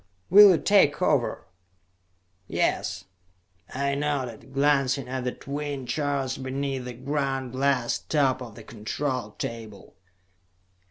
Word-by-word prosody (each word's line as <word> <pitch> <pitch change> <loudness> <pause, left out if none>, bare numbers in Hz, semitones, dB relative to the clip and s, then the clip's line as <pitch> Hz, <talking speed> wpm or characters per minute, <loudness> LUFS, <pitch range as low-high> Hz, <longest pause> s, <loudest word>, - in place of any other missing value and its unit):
"Will 205 +2 +10
you 180 - +5
take 195 -8 +4
over?" - - +1 1.0
"Yes," - - -1 0.7
I 140 +1 -1
nodded, 135 -4 -3
glancing 140 -1 +2
at 130 0 -4
the 125 - 0
twin 140 -1 -5
charts 135 0 -2
beneath 135 0 -3
the 125 - -6
ground 135 0 -2
glass 130 -2 +1
top 135 -4 +1
of 115 -4 -8
the 115 - -11
control 115 +1 -4
table. 110 -4 -7
135 Hz, 115 wpm, -26 LUFS, 125-145 Hz, 1.0 s, Will